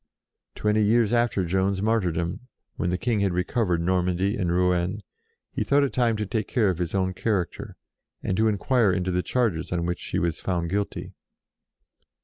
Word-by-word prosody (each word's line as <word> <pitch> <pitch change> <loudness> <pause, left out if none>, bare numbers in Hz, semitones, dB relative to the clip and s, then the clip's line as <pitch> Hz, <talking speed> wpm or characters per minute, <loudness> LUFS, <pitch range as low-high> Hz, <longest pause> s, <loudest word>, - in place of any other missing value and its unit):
Twenty 105 0 +1
years 110 +1 +3
after 120 -6 +2
Joan's 95 +2 0
martyrdom, 95 -1 -1 0.3
when 90 - -1
the 90 - 0
King 115 0 0
had 100 -2 +1
recovered 90 -1 0
Normandy 90 +2 +1
and 90 -4 -1
Rouen, 90 +3 +1 0.5
he - - -1
thought 140 +1 +3
it 140 - -1
time 120 -3 +2
to 105 - -2
take 110 +2 -2
care 110 -6 +2
of 90 - -6
his 90 +1 -2
own 95 -1 0
character, 95 -2 -2 0.5
and 95 - -1
to 110 +3 +3
inquire 110 +1 +2
into 90 0 -1
the 90 0 +1
charges 110 -7 -1
on 85 -1 -1
which 85 0 -2
she - - -3
was 85 -2 -1
found 85 -3 -2
guilty. 100 +1 -3
95 Hz, 175 wpm, -25 LUFS, 90-110 Hz, 0.5 s, years